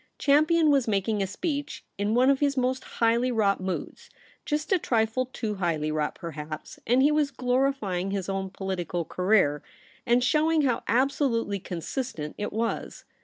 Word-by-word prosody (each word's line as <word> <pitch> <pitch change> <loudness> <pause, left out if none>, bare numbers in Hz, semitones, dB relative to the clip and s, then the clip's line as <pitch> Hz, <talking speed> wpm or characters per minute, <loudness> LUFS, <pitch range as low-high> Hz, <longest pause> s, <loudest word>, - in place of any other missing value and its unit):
' - - -48
Champion 310 +2 +4
was 275 -4 +2
making 205 0 0
a 195 - 0
speech 285 - -4
in 205 +2 0
one 255 +3 +5
of 275 - +1
his 280 -1 +1
most 255 +1 0
highly 235 +2 +1
wrought 205 -5 +1
moods, 185 0 -5 0.4
just 300 +4 -2
a 380 - +4
trifle 230 -1 0
too 225 -4 -4
highly 165 -6 -1
wrought 155 -1 -1
perhaps; 155 -3 -7
and 250 +3 +4
he 290 - +5
was 300 -1 +2
glorifying 250 -8 0
his 195 -2 -3
own 195 -1 -2
political 180 -3 -3
career, 180 -6 +2 0.4
and 245 0 +3
showing 310 +4 +3
how 250 -4 +1
abso 275 +3 +2
lutely 230 -4 -1
consistent 180 - -5
it 210 - -2
w^as. 230 +1 -3
230 Hz, 170 wpm, -27 LUFS, 190-270 Hz, 0.4 s, one